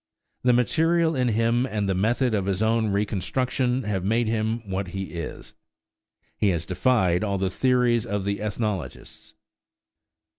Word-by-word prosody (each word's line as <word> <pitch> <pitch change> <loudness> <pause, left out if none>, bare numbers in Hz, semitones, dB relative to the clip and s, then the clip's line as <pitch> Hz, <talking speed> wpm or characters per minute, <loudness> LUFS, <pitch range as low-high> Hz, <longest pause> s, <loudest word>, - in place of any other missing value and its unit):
The 125 0 +3
material 165 +6 +2
in 125 -1 +1
him 115 +2 +1
and 105 -4 -2
the 95 - +1
method 115 +6 +1
of 100 -3 0
his 100 +2 0
reconstruction 115 +4 0
have 100 -4 -2
made 115 +4 +1
him 110 0 -1
what 95 0 -3
he 95 -2 -6
is. 85 -2 -7 0.8
He 105 - +1
has 85 -3 -1
defied 90 -1 +2
all 100 -2 -1
the 95 0 -1
theories 125 -1 +2
of 100 -1 -3
the 100 +1 -2
ethnologists. 105 -1 -5
110 Hz, 145 wpm, -25 LUFS, 95-125 Hz, 0.8 s, The